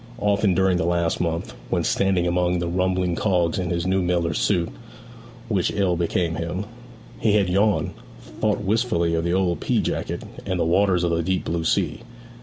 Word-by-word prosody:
Often 100 -3 +2
during 95 -1 +3
the 90 - 0
last 85 -1 0
month, 85 -1 -2 0.2
when - - 0
standing 95 -3 +1
among 90 0 +1
the 85 0 -2
rumbling 90 0 0
cogs 90 -4 +1
in 90 -1 -2
his 85 0 -1
new 95 +1 +1
miller's 85 -3 0
suit, 85 -4 +1 0.8
which - - +1
ill 95 -4 +1
became 85 -1 -1
him, 85 +4 -3 0.5
he 110 - +2
had 100 -3 +3
yawned, 100 +3 +2 0.5
thought 105 -2 +1
wistfully 100 -5 +1
of 80 0 0
the 85 +1 0
old 90 -2 +1
pea - - +1
jacket, - - -2 0.2
and 95 -2 -2
the - - +2
waters 90 +1 +2
of 85 - +1
the 85 0 +1
deep 95 +2 -1
blue 85 0 -1
sea. - - 0
90 Hz, 185 wpm, -23 LUFS, 85-95 Hz, 0.8 s, during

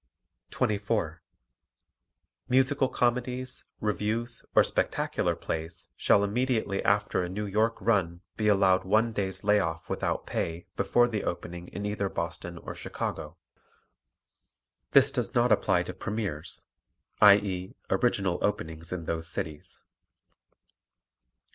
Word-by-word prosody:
24. 100 -6 -1 1.3
Musical 130 +1 +3
comedies, 125 +1 -1
revues 110 +4 -2
or - - +8
spectacular - - 0
plays 80 +1 -5
shall 100 - +4
immediately 110 -2 0
after 105 -1 +2
a 90 - -3
New 105 +3 -3
York 110 +3 +1
run 90 -6 +1
be 105 - 0
allowed 95 -2 +4
one 110 +4 +2
day's 95 -2 -2
lay 105 0 +4
off 80 -4 -3
without - - -1
pay 85 +1 -3
before 120 0 +3
the 110 -4 -2
opening 85 0 -5
in 100 +3 -6
either 105 -1 -1
Boston 85 0 -5
or - - -7
Chicago. 75 +4 -5 1.6
This - - +6
does - - -2
not - - +3
apply - - +3
to - - -6
premiers, 95 -7 -4 0.6
i.e., 100 -3 +5 0.2
original 95 -3 +1
openings 80 -5 -2
in 90 -2 -4
those 80 0 -2
cities. 75 -2 -6
100 Hz, 115 wpm, -28 LUFS, 85-110 Hz, 1.6 s, or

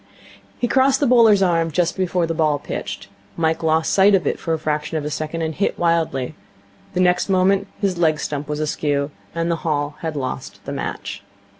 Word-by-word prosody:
He 240 - 0
crossed 265 +1 +3
the 290 - +2
bowler's 230 -6 +6
arm 165 -3 +2
just 170 +2 0
before 180 -2 0
the 165 - -2
ball 155 -2 +2
pitched. - - -6 0.3
Mike 160 0 +1
lost 160 0 +1
sight 200 +1 +6
of 180 -5 0
it - - -1
for 165 - -3
a 160 - +2
fraction 155 +1 -2
of 150 - -3
a 150 - -3
second, 155 +2 -3
and 160 0 -2
hit 195 - -1
wildly. 165 -6 0 0.6
The - - +1
next 180 +1 +2
moment 195 +1 +3
his 190 -4 -1
leg 155 -3 +3
stump 145 -1 -3
was 150 0 -2
askew; 145 -1 -1 0.2
and 165 0 0
the 165 - 0
Hall 150 -3 -2
had 160 -2 -4
lost 130 -3 -5
the - - -5
match. - - -5
165 Hz, 200 wpm, -21 LUFS, 150-185 Hz, 0.6 s, bowler's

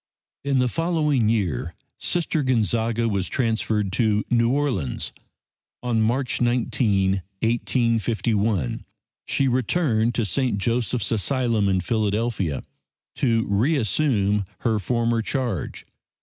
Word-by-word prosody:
In 140 -1 +1
the 125 0 +3
following 150 -6 +1
year 85 - -1 0.2
Sister 165 -2 0
Gonzaga 115 -2 +1
was 100 -4 -1
transferred 110 -4 0
to 105 0 +1
New 115 -1 +3
Orleans. 130 - -1 0.7
On 120 -2 +1
March 125 +4 0
19, 105 -5 +1 0.2
1851, 115 - 0 0.4
she 135 - +1
returned 120 -2 +1
to 115 - +1
St. 125 0 0
Joseph's 115 +1 -1
Asylum 115 -2 +1
in 95 -1 +1
Philadelphia 105 - -1 0.5
to 115 -4 +2
re 115 +11 +2
assume 105 -5 +1 0.2
her 110 -2 +1
former 115 +2 0
charge. 120 - -3
115 Hz, 105 wpm, -23 LUFS, 105-125 Hz, 0.7 s, the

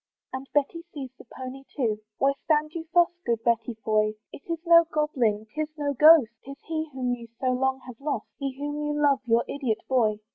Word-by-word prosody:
And 265 +1 -6
Betty 295 +3 0
sees 265 -3 -6
the - - -13
pony 260 +1 -7
too: 220 -6 0 0.2
Why 275 +1 +3
stand 305 0 +1
you 330 -1 -6
thus 345 0 +5
Good 230 -1 -1
Betty 230 0 +1
Foy? 215 0 +2 0.2
It - - -10
is 335 - 0
no 335 0 +8
goblin, 245 -9 0
'tis 305 +1 -1
no 290 -1 -1
ghost, 300 -4 +7
'Tis 275 +1 -9
he 320 -1 -2
whom 255 -2 -1
you 235 -1 -7
so 255 -1 +1
long 265 +1 0
have 250 0 -11
lost, 295 +1 -2
He 275 -2 -4
whom 290 +1 -3
you 295 0 -1
love, 285 -2 +4
your 230 0 +3
idiot 255 -6 -2
boy. 225 -5 +2
270 Hz, 205 wpm, -26 LUFS, 240-300 Hz, 0.2 s, no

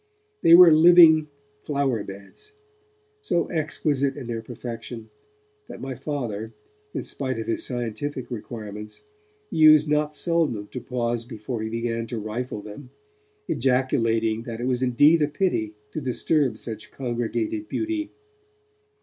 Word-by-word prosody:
They 165 - +8
were 175 -1 +9
living 160 -1 +7 0.3
flower 140 -8 -1
beds, 100 - -12 0.7
so 175 - 0
exquisite 145 -4 -1
in 135 - -6
their 115 -1 -4
perfection, 115 -1 -8 0.6
that - - -9
my 135 0 -5
Father, 115 -5 -4 0.4
in - - -4
spite 130 -3 -3
of 115 - -4
his 115 - -1
scientific 125 +2 -4
requirements, 105 -2 -7 0.5
used 155 -1 +6
not 150 0 0
seldom 155 - 0
to 125 - -6
pause 120 -2 -2
before 115 0 -6
he 110 - -3
began 115 0 -3
to 120 - -5
rifle 110 0 -5
them, 105 +6 -10 0.6
ejaculating 115 -4 +1
that 115 -1 -7
it 120 - -3
was 125 -1 0
indeed 145 +6 +4
a 150 - +3
pity 145 - -1 0.2
to 155 - -4
disturb 130 -1 0
such 110 -1 -7
congregated 135 - -3
beauty. 325 -1 -2
125 Hz, 130 wpm, -24 LUFS, 115-150 Hz, 0.7 s, were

